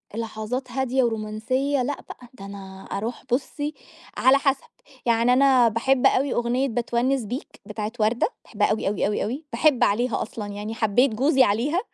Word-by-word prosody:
لحظات 230 +3 -4
هادية 265 0 +1
ورومانسية. 235 +5 -1
لأ 280 +3 -3
بقى، 245 - -11
ده 195 -6 -11
أنا 195 -1 -10
أروح 225 +5 -4
بُصي، 290 +3 -1 0.4
على 260 +1 +5
حسب، 275 -1 0 0.4
يعني 235 +1 +3
أنا 260 -2 +5
باحب 250 +4 +1
أوي 270 0 +3
أغنية 245 +3 0
باتونِّس 240 +2 0
بيك، 245 +7 -7
بتاعة 210 +1 -4
وردة، 220 +3 +2 0.2
باحبها 210 -2 0
أوي، 215 - -1
أوي، 200 0 0
أوي، 205 - -1
أوي، 260 +8 -4
باحب 265 0 +3
عليها 240 +4 +1
أصلًا، 215 -1 -5
يعني 205 +2 -5
حبيت 235 +3 +2
جوزي 265 +2 +4
عليها، 250 - +1
240 Hz, 160 wpm, -24 LUFS, 215-265 Hz, 0.4 s, على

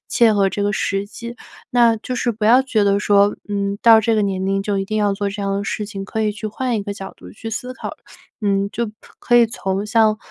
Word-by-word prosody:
切 230 -3 +4
合 195 -1 +3
这 200 +2 -3
个 205 - +1
实 195 0 -1
际。 235 +3 -9 0.3
那 235 -2 +4
就 240 +3 -5
是 245 -1 0
不 215 0 -4
要 240 +4 +6
觉 240 -5 +1
得 200 0 +3
说， 205 0 +3
嗯， 200 0 -2
到 225 -1 +8
这 225 +1 +1
个 215 - +2
年 190 -2 -1
龄 195 0 0
就 200 -1 -1
一 195 - -1
定 215 +2 -3
要 205 -1 +2
做 200 0 -2
这 205 - -6
样 195 0 -1
的 200 - -3
事 210 +1 -3
情， 195 -2 -6
可 220 +3 -3
以 210 -1 0
去 205 +1 -6
换 245 +3 -2
一 205 - -2
个 200 0 -4
角 195 -1 -8
度 - - -13
去 225 +1 -8
思 250 +3 -4
考。 - - -6 0.5
嗯， 200 0 +1
就 235 -2 -2 0.3
可 240 - +2
以 235 - +6
从 195 -3 -3
像， 215 -1 +3
210 Hz, 275 characters per minute, -20 LUFS, 200-225 Hz, 0.5 s, 到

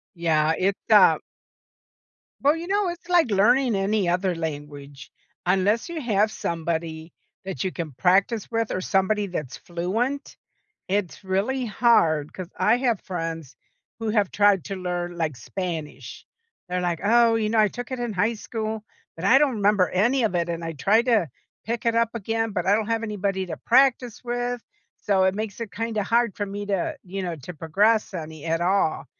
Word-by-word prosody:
Yeah, 160 -2 +2
it's, 195 +1 +1
uh - - +7 1.2
Well, 290 +3 +4
you 335 +1 -6
know, 400 0 +1
it's 345 0 -7
like 345 -8 +3
learning 235 +5 +3
any 195 -1 +1
other 180 +1 +1
language 145 -3 -7 0.4
Unless 195 - +2
you 335 -2 -4
have 215 -4 +2
somebody 165 -2 -3 0.3
that 190 -9 -4
you 190 - 0
can 165 -4 -5
practice 195 - +2
with 230 -1 -1
or 185 - -2
somebody 195 +2 +1
that's 155 -8 -5
fluent, 225 +12 -3 0.5
it's 200 -1 -2
really 205 +8 -1
hard 170 -10 +2
'cause 185 -2 -7
I 195 +5 +4
have 245 -4 0
friends 165 -6 -5 0.4
who 225 -1 -2
have 210 -3 +1
tried 205 -4 +3
to 195 - -4
learn, 175 -1 -3
like, 160 -6 -2
Spanish. 165 - -6 0.4
They're 180 0 -2
like, 175 -2 -1
"Oh, 230 +2 +4
you 220 -1 0
know, 225 +1 0
I 210 -1 +4
took 245 +4 -7
it 250 - -3
in 240 -2 -2
high 205 +4 +1
school, 220 -1 -4 0.3
but 165 - -9
I 230 +8 +6
don't 275 -3 +3
remember 205 -3 +3
any 240 +8 +2
of 210 -5 0
it, 170 0 0
and 170 0 -3
I 165 0 -4
tried 210 - +2
to 220 - +2 0.4
pick 235 +1 -3
it 230 -1 +2
up 230 -1 +3
again, 225 +1 -1
but 180 -3 -2
I 200 +2 +4
don't 215 -1 -1
have 230 0 -1
anybody 200 -3 -2
to 165 -3 -5
practice 245 -2 +2
with. 245 0 -2 0.4
So 195 -2 +3
it 190 0 +2
makes 215 +1 -5
it 220 -3 -5
kinda 225 -1 -2
hard 230 +1 +1
for 205 - -2
me 205 +1 -5
to, 195 -3 -2
you 195 +1 -5
know, 175 -2 -4
to 150 +6 -9
progress 205 +8 +1
any 160 -3 -7
at 165 0 0
all." 175 -4 +1
200 Hz, 185 wpm, -24 LUFS, 175-230 Hz, 1.2 s, uh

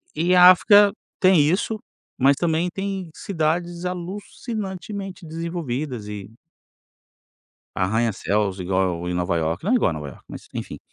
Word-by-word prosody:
e 170 +4 +2
a 180 0 +10
África 205 +2 +6 0.3
tem 185 -2 +5
isso, 180 +8 +1 0.4
mas 140 +2 +5
também 165 +3 0
tem 195 -2 -4
cidades 170 -1 -2
alucinantemente 195 +1 -5
desenvolvidas 155 -8 -4
e 105 -1 -7 1.4
arranha-céus 100 -1 0
igual 90 -2 -1
em - - -2
Nova 90 0 0
Iorque, 80 +2 -2
não 200 - 0
é - - +5
igual 235 - +2
Nova 75 -2 -6
Iorque - - -15
mas - - -10
enfim. - - -6
165 Hz, 130 wpm, -23 LUFS, -, 1.4 s, a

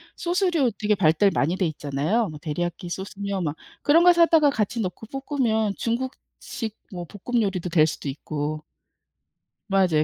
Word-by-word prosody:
소스류 345 - +1
되게 210 -1 +2
발달 180 +2 +4
많이 165 +6 +1
돼 185 - +1
있잖아요. 155 +9 -1
뭐 150 -1 -9
데리야키 175 +3 -3
소스며 195 +1 -4
막 155 -3 -2 0.3
그런 325 +4 +5
거 355 0 +8
사다가 330 -3 +5
같이 225 -2 -1
넣고 185 +3 -4 0.2
볶으면 220 -7 +1
중국식 235 -2 -4 0.2
뭐 175 -2 -6
볶음 220 +7 -2
요리도 185 -4 -1
될 155 -2 +5
수도 150 -2 -4
있고. 150 +2 -4 1.1
맞아요. 180 -6 +3
200 Hz, 315 characters per minute, -24 LUFS, 160-240 Hz, 1.1 s, 거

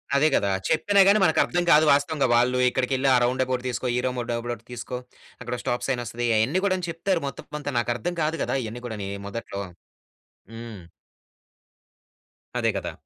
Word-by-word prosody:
అదే 145 +2 +4
కదా! 100 - +1 0.2
చెప్పినా 200 +5 +4
గాని 205 +2 +6
మనకు - - +3
అర్థం 175 0 -1
కాదు 155 +1 +6
వాస్తవంగా. 145 0 +2
వాళ్ళు 125 +1 +3
ఇక్కడికెళ్లి 130 +1 0
ఆ - - +6
రౌండ్అబౌట్ 130 0 0
తీసుకో, 125 +1 -3
ఈ - - +2
రౌండ్అబౌట్ 120 -2 -3
తీసుకో, 125 +1 -5 0.4
అక్కడో 125 0 -4
స్టాప్ 120 - -1
సైనొస్తది. 120 -2 -2
అయన్నీ 140 +13 +1
కూడా 185 -1 +2
చెప్తారు. 170 +2 -1
మొత్తం 135 - -8
కొంతా 145 -1 -4
నాకు 120 0 -1
అర్థం 175 +8 -3
కాదు 155 +2 0
కదా! - - -1
ఇయన్నీ 115 +3 -7
కూడానీ 105 -4 -5 0.2
మొదట్లో. 100 -1 -5 0.9
హ్మ్. 115 -4 -8 1.8
అదే - - +2
కదా! - - -4
125 Hz, 155 wpm, -25 LUFS, 120-150 Hz, 1.8 s, గాని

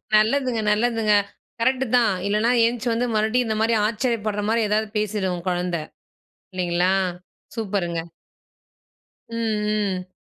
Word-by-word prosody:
நல்லதுங்க, 235 +2 +2
நல்லதுங்க. 225 -1 +2 0.5
கரெக்ட்டு 260 +2 +2
தான். 230 -5 +3
இல்லன்னா, 215 +4 +2
எந்திச்சி 240 +1 -1
வந்து 245 +2 0
மறுபடியும் 220 +3 +1
இந்த 220 -1 -1
மாரி 230 +1 +2
ஆச்சரியப்படுற 220 -2 -1
மாரி 230 +1 +2
ஏதாவது 215 0 +1
பேசிடும் 210 -3 -1
உங்க 175 +1 -8
கொழந்தை. 175 -2 -1 0.7
இல்லைங்களா, 180 +1 +1 0.6
சூப்பருங்க. 190 -6 -2 1.3
ம், 210 -3 -1
ம். 185 - -38
215 Hz, 115 wpm, -23 LUFS, 200-230 Hz, 1.3 s, தான்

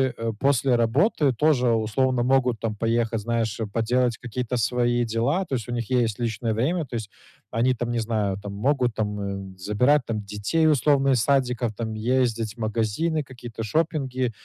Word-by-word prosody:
э, 115 0 -2
после 135 -2 +3
работы 135 - +2
тоже 125 -1 +2
условно 120 +3 +1
могут, 125 -2 +2
там, 110 -2 -2
поехать, 115 +1 0
знаешь, 115 -1 -1
э, 110 - -1
поделать 120 +3 0
какие-то 125 0 -3
свои 120 +1 +1
дела. 120 - 0
То 140 - -2
есть 115 -4 -4
у - - -5
них 120 -2 -3
есть 120 -4 +1
личное 115 -1 -1
время, 155 +10 0
то 130 - -15
есть 110 -3 -4 0.4
они, 120 +3 +2
там, 120 -1 -3
не 120 - 0
знаю, 110 -4 -1
там, 100 0 -6
могут, 125 +3 +1
там, 105 -1 -2
эм, 100 -1 -5
забирать, 125 +10 +2
там, 110 -2 -3
детей 105 +11 0
условно 140 -2 +3
из 125 -4 +3
садиков, 125 -4 +1
там, 110 0 -4
ездить 115 -1 0
в - - -19
магазины, 115 +9 -1
какие-то 120 -4 -8
шопинги, 130 - -1
120 Hz, 180 wpm, -24 LUFS, 110-130 Hz, 0.4 s, после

